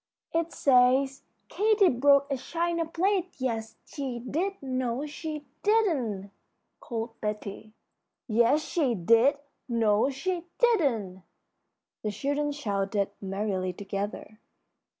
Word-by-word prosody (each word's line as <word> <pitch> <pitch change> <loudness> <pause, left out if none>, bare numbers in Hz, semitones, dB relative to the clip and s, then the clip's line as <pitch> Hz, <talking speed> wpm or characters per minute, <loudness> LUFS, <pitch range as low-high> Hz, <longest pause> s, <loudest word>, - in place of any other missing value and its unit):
'" - - -41
"It 335 0 -8
says, 265 +1 +3 0.3
'Katy 420 -2 +3
broke 280 +3 +4
a - - +2
china 335 +3 -1
plate; 370 +2 0
yes, 225 -4 -3
she 270 -4 -5
did; 320 +11 -2
no, 255 0 -2
she 300 0 -6 0.2
didn't,'" 275 - +1 0.5
called 225 -1 -5
Betty. 210 0 -5 0.5
"Yes, 235 +6 +3
she 285 -8 0
did; 230 +9 +4 0.3
no, 225 0 +3
she 345 +5 -3
didn't!" 250 - +2 0.8
the 215 - -2
children 285 +7 -1
shouted, 200 -6 -1
merrily, 195 -2 -2
together. 200 +2 -5
255 Hz, 110 wpm, -28 LUFS, 215-310 Hz, 0.8 s, broke